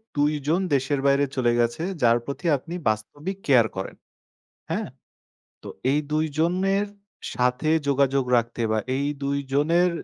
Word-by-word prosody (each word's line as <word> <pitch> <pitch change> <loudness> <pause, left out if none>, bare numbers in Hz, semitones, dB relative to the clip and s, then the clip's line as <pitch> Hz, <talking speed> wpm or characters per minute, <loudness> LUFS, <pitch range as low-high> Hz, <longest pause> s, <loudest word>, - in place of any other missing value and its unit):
২ 145 +1 +2
জন 170 +5 +2
দেশের 135 +1 +1
বাইরে 140 +1 +4
চলে 125 -3 +2
গেছে, 120 +5 0 0.2
যার 120 -1 +5
প্রতি 140 +5 -6
আপনি 170 +6 -9 0.2
বাস্তবিক 145 - -4
কেয়ার 125 -5 +5
করেন। 95 0 -5 0.8
হ্যাঁ? - - -2 0.7
তো - - -8 0.2
এই 145 - +3
২ 155 +1 +2
জনের 190 +4 +1 0.5
সাথে 125 +4 0 0.2
যোগাযোগ 140 -1 +2
রাখতে 115 0 -1
বা 110 - +2 0.2
এই 140 +1 -1 0.2
২ 140 0 0 0.2
জনের 170 +5 +3
140 Hz, 145 wpm, -24 LUFS, 125-160 Hz, 0.8 s, যার